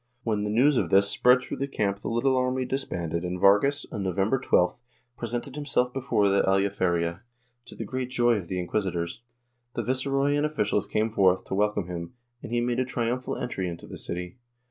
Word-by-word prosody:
When 105 -3 0
the 105 - -2
news 130 +6 +4
of - - +1
this 100 +1 +5
spread 125 +3 +4
through - - -5
the 140 - -2
camp 100 -7 -1
the - - -6
little 125 +3 +2
army 130 0 0
disbanded 85 - -3
and 90 0 -3
Vargas, 105 +10 +4
on 105 - -4
Novem 95 +2 0
ber 135 - +3
12th, 90 -5 +2 0.4
presented 120 +3 -4
himself 135 -4 0
before 120 -6 +1
the 100 0 +3
Aljaferia, 95 -3 +1 0.5
to - - -12
the 115 - -5
great 130 +3 -3
joy 120 -1 +3
of 90 -4 -6
the 95 - -3
inquisitors. 90 0 -2 0.5
The - - -1
viceroy 135 +2 0
and 145 - +1
officials 110 -10 0
came 110 +1 0
forth 95 -3 +3
to - - -6
welcome 105 -1 +1
him, 85 +5 -6 0.3
and - - -8
he 120 0 +1
made 120 0 0
a - - +3
triumphal 125 0 -2
entry 95 -7 -3
into 85 - -8
the - - -9
city. 90 +4 -5
110 Hz, 200 wpm, -27 LUFS, 95-125 Hz, 0.5 s, this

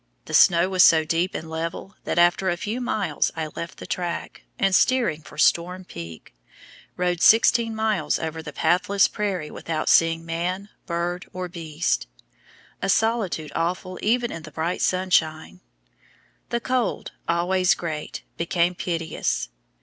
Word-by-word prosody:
The - - -9
snow 175 -1 +6
was 190 -1 +2
so 160 -3 +6
deep 170 +4 0
and 160 - -5
level 165 +4 -5
that - - -2
after 175 +2 +4
a 175 - 0
few 215 +7 -3
miles 215 -5 0
I 160 -1 -2
left 170 - -6
the - - -9
track, 175 -1 -4 0.2
and 195 -1 +2
steering 235 -7 +3
for 150 - -14
Storm 180 +4 +2
Peak, 85 - -10 0.6
rode 180 -1 0
sixteen 225 0 +5
miles 215 -8 0
over 160 0 -4
the - - -8
pathless 195 +3 +2
prairie 190 -7 -3
without 160 -2 -3
seeing 165 0 +4
man, 180 +4 -3 0.2
bird, 175 +1 -2
or 185 0 -4
beast 165 - -2 0.7
a 195 - -1
solitude 195 -8 +1
awful 180 +2 -2
even 240 +3 +1
in 165 - -6
the 155 - -10
bright 160 +4 -2
sunshine. 160 - +1 0.9
The 235 - 0
cold, 255 -1 -1 0.2
always 180 +2 +2
great, 155 -3 -5
became 170 +1 +1
piteous. 165 - -2
175 Hz, 145 wpm, -24 LUFS, 165-190 Hz, 0.9 s, snow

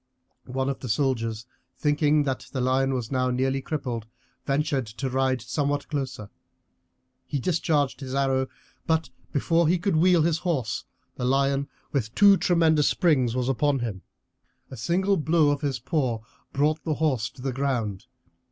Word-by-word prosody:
One 130 +1 -2
of 135 - -2
the 125 - -6
soldiers, 115 -3 0 0.3
thinking 150 0 +2
that 135 -2 -3
the 135 - -3
lion 130 +1 +2
was 125 -1 -4
now 130 -1 +1
nearly 130 +2 0
crippled, 125 -7 -4 0.4
ventured 140 -3 0
to 125 +5 -4
ride 130 -2 +1
somewhat 145 +3 -1
closer; 130 -8 -4 0.9
he 140 +2 -3
discharged 150 -2 0
his 135 -1 -5
arrow, 135 -1 +1 0.4
but 160 -5 +1 0.2
before 165 +3 +2
he 180 +3 +3
could 180 0 0
wheel 175 0 +5
his 165 0 +1
horse 140 -11 -2 0.3
the 125 - -2
lion 135 +1 +2 0.2
with 115 -6 -2
two 200 -1 +7
tremendous 160 -5 +3
springs 130 - +2
was 125 -1 0
upon 140 +2 +2
him. 110 -7 -4 0.7
A - - -6
single 185 - +1
blow 155 -1 +3
of 145 - -2
his 140 -3 -1
paw 130 -3 -1 0.3
brought 150 +3 +1
the 155 -2 -1
horse 130 -8 0
to 125 0 -14
the 135 -1 -1
ground. 120 -6 -2
135 Hz, 160 wpm, -26 LUFS, 125-155 Hz, 0.9 s, two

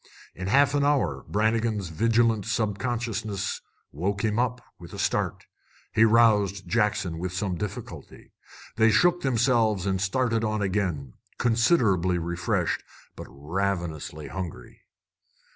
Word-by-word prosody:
In 90 +1 -6
a - - -2
half 140 +5 +4
hour 145 -1 +1
Brannigan's 110 -2 0
vigilant 115 +3 +1
subconsciousness 110 -1 -2 0.3
woke 100 +7 -2
him 110 +1 0
up 125 0 0 0.2
with - - -12
a - - -7
start. - - -1 0.5
He 110 0 +5
roused 105 -4 +3
Jackson 105 -5 0
with 90 +1 -4
some 95 0 -2
difficulty. 100 +3 -7 0.5
They 110 0 +5
shook 175 +9 +3
themselves 115 -6 +2
and 95 -1 0
started 115 +3 0
on 110 -1 -1
again, 90 -10 -2 0.2
considerably 110 - +2
refreshed, 85 0 -1 0.3
but - - -9
ravenously 80 0 -3
hungry. 95 -4 -7
105 Hz, 120 wpm, -26 LUFS, 95-115 Hz, 0.5 s, He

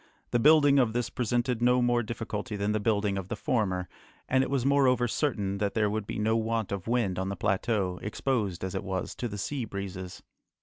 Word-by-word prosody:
The 120 - +2
building 145 +1 +6
of 120 -4 +2
this 120 -1 -1
presented 120 0 0
no 125 +1 +4
more 120 -1 +2
difficulty 110 -2 -4
than 100 +1 -1
the 110 - +1
building 100 -2 +1
of 95 - -7
the - - -3
former, 95 -6 -1 0.4
and 130 0 +3
it - - -3
was 135 -2 0
moreover 130 -3 +3
certain 105 -7 -1
that 100 -1 -1
there 105 -2 +2
would 110 -1 -3
be - - -4
no 110 +1 +1
want 115 -1 -1
of 100 -1 -4
wind 115 -6 0
on 95 +1 -2
the 100 - -3
plateau, 100 -1 0
exposed 105 -4 -2
as 95 - -3
it 95 - -3
was 95 -1 -3
to 120 - -2
the 105 -2 -6
sea 125 +7 -3
breezes. 100 -3 -6
110 Hz, 215 wpm, -28 LUFS, 100-120 Hz, 0.4 s, building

